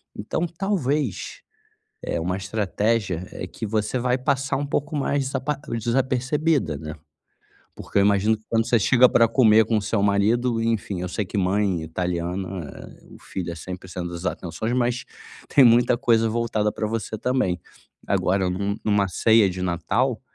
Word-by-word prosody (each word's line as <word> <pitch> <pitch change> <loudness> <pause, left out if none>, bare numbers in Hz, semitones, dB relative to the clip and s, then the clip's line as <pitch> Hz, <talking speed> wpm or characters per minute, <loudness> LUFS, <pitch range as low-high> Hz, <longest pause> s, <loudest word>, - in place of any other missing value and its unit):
então 110 +11 -2
talvez, 155 - -2 0.6
eh, - - -2
uma 90 +3 -1
estratégia, 100 -1 -1
é - - -6
que - - -11
você 105 +3 -1
vai 125 +1 +1
passar 135 +1 0
um 145 - -2
pouco 145 +2 -2
mais 140 -1 0
desapa 135 +2 -2 0.2
desapercebido, 130 - 0
né, 75 0 -7 0.8
porque - - -4
eu - - +6
imagino 105 +2 +3
que 110 - -27
quando 115 -1 +1
você 120 - +4
chega 125 +4 +5
pra 115 - +4
comer 110 -2 +5
com 110 - 0
o - - 0
seu 100 +1 -1
marido, 115 +4 +2
enfim, 110 -5 -1
eu 90 - -3
sei 105 +3 -2
que 100 - -5
mãe 95 -1 +1
italiana, 90 +2 -3 0.6
o - - -13
filho 90 -2 -5
é - - -6
sempre 90 +2 -8
o - - -13
centro 90 0 -5
das 85 +1 -7
atenções 90 +6 -3
mas, 125 0 0 0.4
tem 140 - +6
muita 120 0 +5
coisa 115 -3 +2
voltada 110 -2 0
pra 110 - -3
você 110 0 -3
também. 110 -7 0 0.5
Agora 95 +1 +1
em 90 - -1
um 100 +1 -1
em - - -8
uma 100 -1 +3
ceia 110 +3 +4
de 90 0 -5
Natal, 100 +8 0
110 Hz, 175 wpm, -23 LUFS, 95-125 Hz, 0.8 s, eu